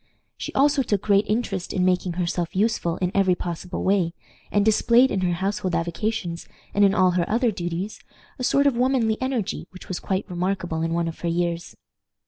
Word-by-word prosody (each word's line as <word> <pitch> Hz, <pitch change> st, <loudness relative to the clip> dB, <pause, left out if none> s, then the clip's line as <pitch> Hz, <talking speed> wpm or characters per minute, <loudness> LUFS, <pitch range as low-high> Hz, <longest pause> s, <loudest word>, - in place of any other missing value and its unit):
She -, -, -6 dB
also 285 Hz, +1 st, +4 dB
took 205 Hz, -6 st, -1 dB
great 200 Hz, 0 st, +3 dB
interest 210 Hz, -5 st, -1 dB
in 185 Hz, -1 st, +1 dB
making 180 Hz, -1 st, +1 dB
herself 175 Hz, 0 st, -2 dB
useful 195 Hz, -5 st, +1 dB
in 180 Hz, -1 st, -1 dB
every 190 Hz, -2 st, +3 dB
possible 175 Hz, +1 st, -5 dB
way, 185 Hz, -3 st, +1 dB, 0.4 s
and 205 Hz, 0 st, +2 dB
displayed 235 Hz, +4 st, +4 dB
in 190 Hz, -, 0 dB
her 180 Hz, -1 st, +1 dB
household 190 Hz, 0 st, -1 dB
avocations, 175 Hz, +1 st, -2 dB, 0.3 s
and 205 Hz, -, +3 dB
in 200 Hz, 0 st, +4 dB
all 185 Hz, -2 st, +4 dB
her 175 Hz, -1 st, 0 dB
other 235 Hz, +1 st, +2 dB
duties, 180 Hz, +1 st, -4 dB, 0.4 s
a -, -, -3 dB
sort 280 Hz, +3 st, +3 dB
of 280 Hz, -4 st, +3 dB
womanly 245 Hz, -3 st, +1 dB
energy 260 Hz, -6 st, -2 dB
which 185 Hz, -, -13 dB
was 185 Hz, -, -3 dB
quite 190 Hz, 0 st, -2 dB
remarkable 175 Hz, -3 st, -2 dB
in 165 Hz, 0 st, -1 dB
one 170 Hz, 0 st, 0 dB
of 165 Hz, -, -6 dB
her 170 Hz, -, -2 dB
years. 170 Hz, 0 st, -2 dB
190 Hz, 190 wpm, -24 LUFS, 175-220 Hz, 0.4 s, also